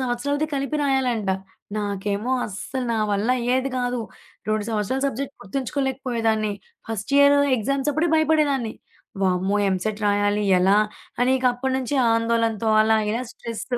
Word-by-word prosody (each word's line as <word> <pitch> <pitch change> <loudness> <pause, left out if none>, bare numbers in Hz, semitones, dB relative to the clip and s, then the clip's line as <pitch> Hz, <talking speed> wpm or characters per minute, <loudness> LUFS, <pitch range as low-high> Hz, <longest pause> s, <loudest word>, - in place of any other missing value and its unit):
సంవత్సరాలది 280 +4 -1
కలిపి 275 +2 -1
రాయాలంట. 255 -7 0 0.5
నాకేమో 205 +2 -2 0.2
అస్సల 230 +6 -5
నా - - 0
వల్ల 205 +4 0
అయ్యేది 255 +3 0
కాదు. 245 0 -1 0.5
2 215 -1 0
సంవత్సరాల 220 +4 -1
సబ్జెక్ట్ 275 +1 -4
గుర్తుంచుకోలేకపోయేదాన్ని. 240 -3 -1 0.4
ఫస్ట్ 225 +4 -4
ఇయర్ 285 0 +6 0.2
ఎగ్జామ్స్ 275 +6 0
అప్పుడే 320 +3 +1
భయపడేదాన్ని. 295 -7 +2 0.5
వామ్మో! 190 +2 +1
ఎంసెట్ 205 +3 -2
రాయాలి 205 0 +1
ఎలా? 190 +3 +4 0.5
అనిక 260 +1 +2
అప్పటి 260 +2 -2
నుంచి 265 +2 -2 0.2
ఆందోళనతో 230 -1 +1
అలా 220 0 +3
ఇలా 235 +3 -1
స్ట్రెస్. 230 -1 -6
235 Hz, 125 wpm, -23 LUFS, 210-270 Hz, 0.5 s, ఇయర్